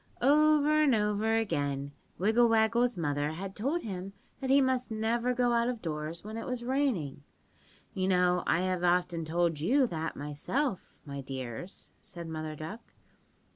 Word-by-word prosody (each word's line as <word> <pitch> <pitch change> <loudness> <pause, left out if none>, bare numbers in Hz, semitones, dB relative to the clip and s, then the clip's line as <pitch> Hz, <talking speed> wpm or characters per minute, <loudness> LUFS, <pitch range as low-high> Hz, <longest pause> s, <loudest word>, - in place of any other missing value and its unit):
"Over 305 +2 +5
and 280 -5 +4
over 210 +1 +1
again 140 -10 -1 0.3
Wiggle 225 +5 +4
Waggle's 230 +1 +3
mother 145 -2 -1
had 190 +3 -6
told 280 +11 -1
him 195 -2 -5 0.3
that 265 - -3
he 275 +1 +6
must 260 -2 +1
never 230 +3 0
go 245 -1 +2
out 235 +1 +2
of 245 -2 -3
doors 155 -1 -4
when 215 +2 -6
it 225 - -5
was 250 -1 -3
raining. 240 - -1 0.7
(You 190 -3 -1
know 180 -1 +3
I 165 - +3
have 185 -1 -1
often 175 -2 +1
told 165 -1 0
you 255 - +3
that 160 -7 -3
myself, 175 - -3
my 140 -1 -6
dears," 130 +5 -7
said 170 -1 -9
Mother 155 -1 -5
Duck. 160 +10 -9
195 Hz, 160 wpm, -30 LUFS, 160-245 Hz, 0.7 s, he